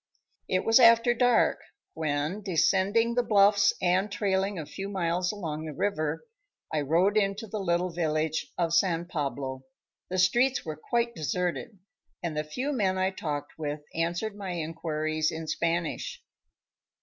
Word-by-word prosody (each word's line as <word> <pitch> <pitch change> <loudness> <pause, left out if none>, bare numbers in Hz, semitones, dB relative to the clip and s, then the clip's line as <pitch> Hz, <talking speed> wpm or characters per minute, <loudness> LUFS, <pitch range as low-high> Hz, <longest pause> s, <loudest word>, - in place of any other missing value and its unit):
It 185 - +1
was 225 +3 +6
after 230 0 +6
dark 245 0 +3 0.3
when, 155 +5 -2
descending 200 +5 +2
the 245 - +2
bluffs 205 -2 +4
and 185 +3 +1
trailing 195 -1 0
a 160 - -4
few 195 +6 -6
miles 180 -2 0
along 160 -7 -5
the 155 -2 -6
river, 195 - -1 0.5
I 155 - +1
rode 175 +8 +2
into 200 +1 0
the 215 0 -5
little 180 -1 0
village 160 -2 -1
of 170 -2 0
San 170 -1 +2
Pablo. 140 -5 -3 0.5
The 185 - -2
streets 240 +9 +3
were 155 -1 -4
quite 235 - -1
deserted, 180 +4 -3 0.5
and 165 -3 -3
the 150 - -1
few 250 - -3
men 195 -7 +1
I 190 0 +1
talked 150 -5 -5
with 150 -1 -3
answered 175 +6 -2
my 195 -3 -5
inquiries 155 -1 -2
in 160 0 -5
Spanish. 170 - -2
180 Hz, 150 wpm, -28 LUFS, 155-205 Hz, 0.5 s, was